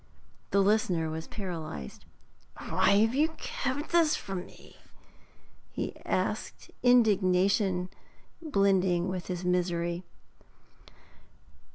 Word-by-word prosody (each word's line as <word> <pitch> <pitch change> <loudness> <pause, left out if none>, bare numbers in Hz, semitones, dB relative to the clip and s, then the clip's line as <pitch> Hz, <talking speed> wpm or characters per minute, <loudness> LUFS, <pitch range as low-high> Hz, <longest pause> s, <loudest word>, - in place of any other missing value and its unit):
The 200 - +3
listener 190 -6 +1
was 160 +1 -5
paralysed. 160 - -7 0.5
'Why - - +2
have 225 +2 +2
you 295 +4 +3
kept 280 +3 -3
this 335 -3 +4
from 190 -3 -5
me?' - - -17 0.9
he - - -4
asked, - - -2
indignation 195 -5 +3 0.5
blending 190 - +2
with 185 -2 -4
his 180 -1 -4
misery. 175 -1 0
185 Hz, 90 wpm, -29 LUFS, 175-220 Hz, 0.9 s, this